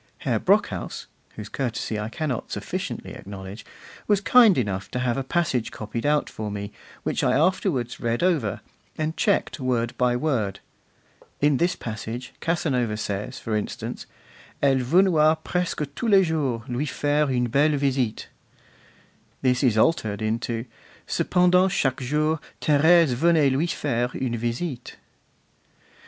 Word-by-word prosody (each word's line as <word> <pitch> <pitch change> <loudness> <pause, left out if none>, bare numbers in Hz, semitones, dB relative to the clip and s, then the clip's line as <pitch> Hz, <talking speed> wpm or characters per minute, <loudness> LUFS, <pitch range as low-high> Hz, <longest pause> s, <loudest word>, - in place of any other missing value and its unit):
Herr - - +1
Brockhaus - - 0 0.3
(whose 105 -1 -7
courtesy 115 -3 -3
I 105 +1 -3
cannot 140 -2 -3
sufficiently - - -4
acknowledge) 95 +1 -9 0.4
was 205 -2 +3
kind 225 -1 +6
enough 100 -6 -2
to - - -4
have 125 -1 0
a 135 - -2
passage 135 -5 0
copied 115 +4 -4
out 150 0 +2
for 110 -1 -5
me, 100 0 -5 0.3
which - - -1
I 125 - +3
afterwards 155 - 0
read 115 +4 -1
over, 155 - +1 0.4
and 155 +1 -2
checked 200 -6 0
word 120 -3 -1
by 125 -1 +3
word. 120 -9 -1 0.8
In 145 -1 +3
this 175 +4 +1
passage 115 +2 -6
Casanova 130 - 0
says, 105 +4 -4
for 115 -3 -3
instance: 105 - -4 0.5
'Elle 135 -2 +3
venoit 160 +2 +3
presque 180 -4 -1
tous 235 - -2
les 195 -2 +6
jours 140 -8 -1
lui 130 +5 -2
faire 145 +1 +1
une 125 -2 +1
belle 145 +5 +2
visite.' 130 -5 -1 1.2
This 125 -1 +2
is 120 -5 +3
altered 110 -5 +2
into: 115 +1 -2 0.4
'Cependant 180 +1 +3
chaque 135 -9 0
jour 150 +4 0 0.2
Thérèse 155 0 +4
venait 155 +1 +3
lui 145 +6 +1
faire 125 -7 -1
une 125 -3 -2
visite. 120 +3 -4
130 Hz, 140 wpm, -24 LUFS, 115-160 Hz, 1.2 s, kind